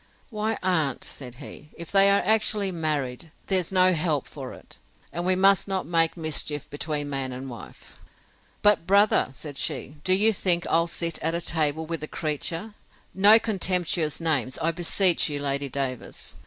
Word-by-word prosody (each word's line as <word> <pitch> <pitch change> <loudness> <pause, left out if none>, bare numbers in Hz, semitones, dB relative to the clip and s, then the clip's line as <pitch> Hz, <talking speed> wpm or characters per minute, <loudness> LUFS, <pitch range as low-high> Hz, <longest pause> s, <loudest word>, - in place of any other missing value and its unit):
Why, 215 0 -2
aunt, 160 -8 0
said 125 -3 -6
he, 145 +2 -12
if 170 -1 -8
they 195 0 +5
are 200 0 +3
actually 215 -2 +2
married, 155 -3 -3 0.2
there's 185 -3 0
no 185 -1 +4
help 155 -4 -1
for - - -9
it; - - -15 0.3
and 175 +1 -3
we 185 - +3
must 195 +1 +4
not 190 -1 -2
make 165 0 +1
mischief 155 -2 -1
between 145 0 -3
man 135 -2 -3
and 130 +1 -7
wife. 115 -6 -13 0.6
But 205 -5 +3
brother, 200 +2 +4
said 140 +1 -8
she, 145 +3 -2
do 185 - +2
you 215 +4 +4
think 175 -3 +1
I'll 165 +1 +2
sit 170 -1 -2
at 165 +2 -1
table 160 -1 -1
with 165 0 -4
the 155 - -6
creature? 165 +8 -3 0.4
No 205 +3 +7
contemptuous 180 -7 0
names, 145 -6 0
I 165 - +1
beseech 175 +1 +2
you, 145 - -3
Lady 140 0 -2
Davers! 130 -2 -4
165 Hz, 170 wpm, -25 LUFS, 145-190 Hz, 0.6 s, No